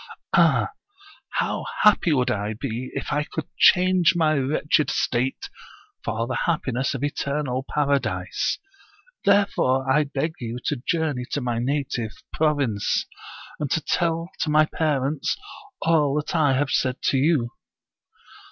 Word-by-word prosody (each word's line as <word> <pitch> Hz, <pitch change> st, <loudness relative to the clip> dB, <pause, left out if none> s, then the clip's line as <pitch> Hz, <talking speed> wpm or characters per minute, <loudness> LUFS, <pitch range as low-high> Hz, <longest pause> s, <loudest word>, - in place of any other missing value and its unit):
Ah! -, -, +4 dB, 0.6 s
how -, -, -1 dB, 0.2 s
happy 210 Hz, -5 st, +5 dB
would 125 Hz, -4 st, +2 dB
I 105 Hz, -1 st, -2 dB
be 125 Hz, -1 st, -4 dB
if 140 Hz, -, -4 dB
I 150 Hz, +1 st, +1 dB
could 160 Hz, +1 st, -6 dB
change 180 Hz, -1 st, +5 dB
my 160 Hz, -2 st, +3 dB
wretched 150 Hz, +2 st, +1 dB
state 125 Hz, +2 st, -1 dB, 0.6 s
for 115 Hz, 0 st, -2 dB
the 130 Hz, +1 st, -2 dB
happiness 135 Hz, -5 st, 0 dB
of 135 Hz, -, -4 dB
eternal 140 Hz, -2 st, -2 dB
paradise. 145 Hz, -1 st, 0 dB, 0.7 s
Therefore 195 Hz, -10 st, +3 dB
I 150 Hz, +3 st, +3 dB
beg 145 Hz, +3 st, -2 dB
you 120 Hz, -1 st, -5 dB
to 145 Hz, -5 st, -1 dB
journey 155 Hz, -7 st, 0 dB
to 145 Hz, -, 0 dB
my 120 Hz, -2 st, -1 dB
native 125 Hz, -4 st, -2 dB, 0.2 s
province, 145 Hz, -10 st, +1 dB, 0.5 s
and 150 Hz, -2 st, -2 dB
to 160 Hz, -, +1 dB
tell 165 Hz, +2 st, -1 dB
to -, -, 0 dB
my 155 Hz, 0 st, +5 dB
parents 150 Hz, -2 st, -1 dB, 0.5 s
all 150 Hz, -4 st, +3 dB
that 150 Hz, +2 st, -2 dB
I 145 Hz, -4 st, +3 dB
have 130 Hz, +1 st, 0 dB
said 130 Hz, 0 st, 0 dB
to 135 Hz, -, +2 dB
you.' 135 Hz, -4 st, +2 dB
140 Hz, 135 wpm, -24 LUFS, 130-155 Hz, 0.7 s, happy